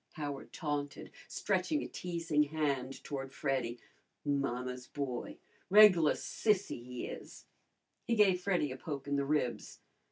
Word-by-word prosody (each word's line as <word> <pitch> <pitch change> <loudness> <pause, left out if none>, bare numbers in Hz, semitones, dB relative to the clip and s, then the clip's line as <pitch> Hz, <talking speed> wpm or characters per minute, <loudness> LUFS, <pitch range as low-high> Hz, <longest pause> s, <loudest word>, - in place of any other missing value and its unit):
Howard 145 -3 -5
taunted, 145 -3 -3 0.2
stretching 305 -1 0
a - - -4
teasing 165 -4 -1
hand 140 -3 -2
toward 135 -2 -5
Freddy. 130 -4 -1 0.5
"Mamma's 125 -3 -1
boy! 135 -4 -4 0.3
Reg'lar 190 -6 +8
sissy, 205 - 0
he 125 0 -5
is!" - - -9 0.6
He 235 - +2
gave 195 -4 +4
Freddy 180 -7 +1
a 130 - -5
poke 140 0 -5
in 145 - 0
the 140 0 +1
ribs. 140 -4 -1
145 Hz, 130 wpm, -33 LUFS, 135-170 Hz, 0.6 s, Reg'lar